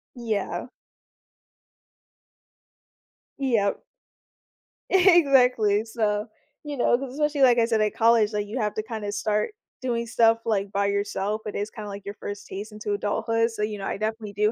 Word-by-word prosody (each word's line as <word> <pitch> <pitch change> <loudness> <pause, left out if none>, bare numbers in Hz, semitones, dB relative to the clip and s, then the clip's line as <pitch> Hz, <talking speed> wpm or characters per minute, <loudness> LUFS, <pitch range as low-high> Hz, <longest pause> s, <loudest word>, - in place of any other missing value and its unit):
Yeah. 220 -4 -3 2.7
Yep. 230 -7 +1 1.1
Exactly. 260 - +4
So, 215 -2 -1 0.4
you 295 -1 -5
know, 240 - +3
'cause 265 0 -6
especially, 295 0 0
like 245 -2 +6
I 230 - +4
said, 225 -2 +1
at 210 - +1
college, 225 -2 +3
like, 210 0 -2
you 220 +5 -5
have 210 -1 0
to 215 - -2
kinda 215 -2 -5
start 210 - -1 0.3
doing 235 -2 -1
stuff, 230 0 +3
like, 205 -3 0
by 200 0 +1
yourself, 200 +1 -1
it 210 - -5
is 205 +1 -2
kinda, 215 -1 -8
like, 200 0 -7
your 200 +1 -6
first 205 -1 -7
taste 205 +3 -7
into 210 -1 -3
adulthood 225 +3 0
so, 225 - -6
you 210 0 -2
know, 195 - -6
I - - -2
definitely 215 0 -3
do 210 +2 +2
215 Hz, 160 wpm, -25 LUFS, 205-235 Hz, 2.7 s, like